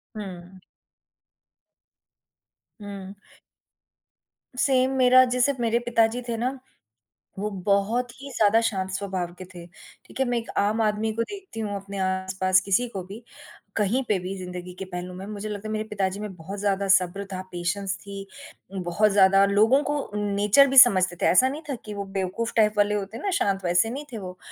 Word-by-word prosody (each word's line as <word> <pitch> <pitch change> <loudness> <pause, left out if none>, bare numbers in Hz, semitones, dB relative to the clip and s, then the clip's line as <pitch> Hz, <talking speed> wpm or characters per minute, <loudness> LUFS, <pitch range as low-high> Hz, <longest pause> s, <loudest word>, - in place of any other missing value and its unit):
हुँ। 185 -2 -8 2.2
हुँ। 200 -1 -8 1.4
Same 260 -1 +3
मेरा, 255 0 +7
जैसे 250 +3 +1
मेरे 235 0 +1
पिता 230 -2 +4
जी 245 +2 -5
थे 235 - -2
ना, 255 +3 -2 0.8
वो 210 +1 -2 0.2
बहुत 215 +5 +1
ही 280 - -8
ज़्यादा 220 +1 +4
शांत 190 -4 -1
स्वभाव 185 -3 -3
के 185 - -7
थे, 170 -1 -10 0.4
ठीक - - -12
है, 265 - +3
मैं 245 -1 0
एक 230 - -5
आम 210 +3 +2
आदमी 215 +1 0
को 230 +1 0
देखती 385 - -9
हूँ 205 -2 -3
अपने 195 0 -7
आस-पास, 190 0 +1
किसी 200 +6 +1
को 190 -5 -6
भी 205 +5 -10 0.5
कहीं 225 +5 +1
पे 210 - +2
भी 185 +2 -5
ज़िंदगी 180 0 -7
के 190 - -4
पहलू 180 0 -6
में, 190 +2 -8
मुझे 210 0 -6
लगता 210 +1 -5
है - - -4
मेरे 215 - -1
पिता 195 -2 0
जी 195 +2 -7
में 210 -2 -6
बहुत 190 +4 -8
ज़्यादा 200 -1 0
सब्र 185 +2 -1
था, 185 - -4
पेशेंस 190 +2 -2
थी, 200 0 -8 0.5
बहुत 185 +4 +1
ज़्यादा 195 0 +5
लोगों 220 +8 +4
को 290 -2 -3
नेचर 205 +6 +4
भी 270 0 0
समझते 185 -8 +7
थे, - - +2
ऐसा 255 +8 +5
नहीं 295 +3 -6
था 270 - -1
कि 210 - -6
वो 200 -1 -5
बेवकूफ़ 195 +5 -2
टाइप 215 -1 +4
वाले 205 0 +3
होते 205 +2 -4
ना 390 +10 -2
शांत, 195 -1 0
वैसे 175 +5 +3
नहीं 280 +5 -6
थे 230 - -5
वो, 185 -3 -8
205 Hz, 185 wpm, -25 LUFS, 190-230 Hz, 2.2 s, मेरा